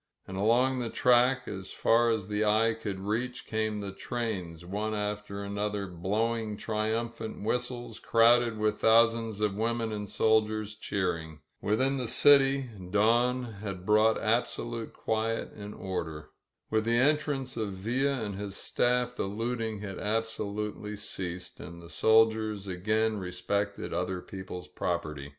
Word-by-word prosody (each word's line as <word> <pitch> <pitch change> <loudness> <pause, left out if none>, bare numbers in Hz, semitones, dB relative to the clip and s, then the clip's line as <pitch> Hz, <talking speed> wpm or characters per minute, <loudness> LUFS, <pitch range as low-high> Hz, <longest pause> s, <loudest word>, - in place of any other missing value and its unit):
And 95 - -6
along 120 +6 +3
the 120 -2 -2
track, 125 +1 +3
as 95 -2 -6
far 115 +1 +3
as 110 -4 0
the 105 +1 0
eye 110 +2 +3
could 105 -3 -5
reach, 115 +5 -2
came 110 -1 -1
the 100 -1 -4
trains, 95 -6 -4
one 105 +4 -2
after 105 -1 -3
another, 100 0 -2
blowing 105 +5 -1
triumphant 110 +1 -2
whistles, 120 +2 -2
crowded 115 0 +4
with 105 0 0
thousands 115 -1 +4
of 105 -2 +2
women 115 +1 -1
and 105 -1 -4
soldiers 110 -1 +2
cheering. 85 -7 -3 0.2
Within 130 +7 +1
the 125 -2 -2
city, 135 +1 +5 0.2
dawn 120 +5 +3 0.2
had 95 -4 -5
brought 110 +2 +4
absolute 115 0 -1
quiet 110 +1 -1
and 105 0 -8
order. 80 -5 -5 0.4
With 110 0 +2
the 115 +1 +2
en 145 +5 +5
trance 135 -4 -4
of 110 -4 -2
Villa 125 +6 0
and 105 -1 -3
his 100 -1 -5
staff 125 +2 +1
the - - -1
looting 110 +1 -3
had 100 -3 -6
absolutely 105 -1 -2
ceased 90 -3 -5
and 85 +4 -9
the 85 0 -12
soldiers 110 -2 +3
again 110 +4 0
respected 100 +3 -2
other 90 +2 -1
people's 95 -1 -8
property. 75 -5 -3
110 Hz, 140 wpm, -29 LUFS, 100-115 Hz, 0.4 s, city